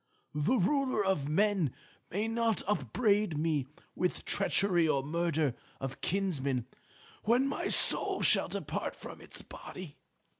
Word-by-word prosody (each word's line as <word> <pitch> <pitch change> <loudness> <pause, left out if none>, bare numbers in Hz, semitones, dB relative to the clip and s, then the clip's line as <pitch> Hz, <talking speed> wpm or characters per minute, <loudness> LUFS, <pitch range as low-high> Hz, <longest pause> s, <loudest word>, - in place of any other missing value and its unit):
The 150 - +1
Ruler 255 +1 0
of 150 -7 -1
Men 190 - +1 0.3
may 205 +5 -2
not 225 -2 0
upbraid 210 -4 0
me 150 -4 -1 0.3
with 180 - -2
treachery 195 -4 +2
or 140 -3 0
murder 160 -2 -1 0.3
of 135 0 -6
kinsmen 140 - -2 0.6
when 245 +5 +2
my 275 - -3
soul - - +6
shall - - +5
depart - - -5
from - - -11
its - - -7
body. 175 -6 -10
180 Hz, 125 wpm, -30 LUFS, 150-210 Hz, 0.6 s, soul